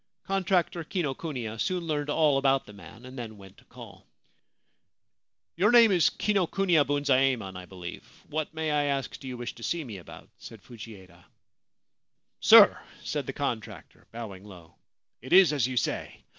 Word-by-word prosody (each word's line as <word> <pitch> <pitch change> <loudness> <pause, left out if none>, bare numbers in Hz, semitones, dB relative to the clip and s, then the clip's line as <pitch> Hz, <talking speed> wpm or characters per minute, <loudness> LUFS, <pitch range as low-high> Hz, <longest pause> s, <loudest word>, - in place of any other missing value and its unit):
Contractor 185 -3 0
Kinokuniya 135 - -4
soon 185 -2 -1
learned 150 -2 -2
all 145 -2 +3
about 135 -1 +2
the 105 - -13
man, 110 +4 -14
and 130 +1 -11
then 110 -3 -7
went 95 -1 -15
to - - -21
call. - - -14 1.5
'Your 195 +5 +3
name 235 -3 +7
is 175 -4 +4
Kinokuniya 195 -5 +1
Bunzaemon, 135 -8 +1
I 90 0 -8
believe. 90 -2 -9 0.2
What, 155 0 -3
may 160 -1 -3
I 145 -1 +1
ask, 140 -3 -3
do 135 - -10
you 125 -1 -6
wish 120 0 -6
to 120 - -15
see 165 +7 -2
me 110 -7 -8
about? 90 - -13
' - - -48
said 110 -4 -12
Fujieda. 100 -7 -13 0.6
' - - -55
Sir,' - - +7 0.2
said - - -3
the - - -4
contractor, - - -6
bowing 110 -5 -8
low, 90 -5 -14 0.3
' - - -60
it 130 - -5
is 185 -4 +7
as 135 -5 +1
you 130 -1 -5
say. - - -3
135 Hz, 170 wpm, -27 LUFS, 110-160 Hz, 1.5 s, name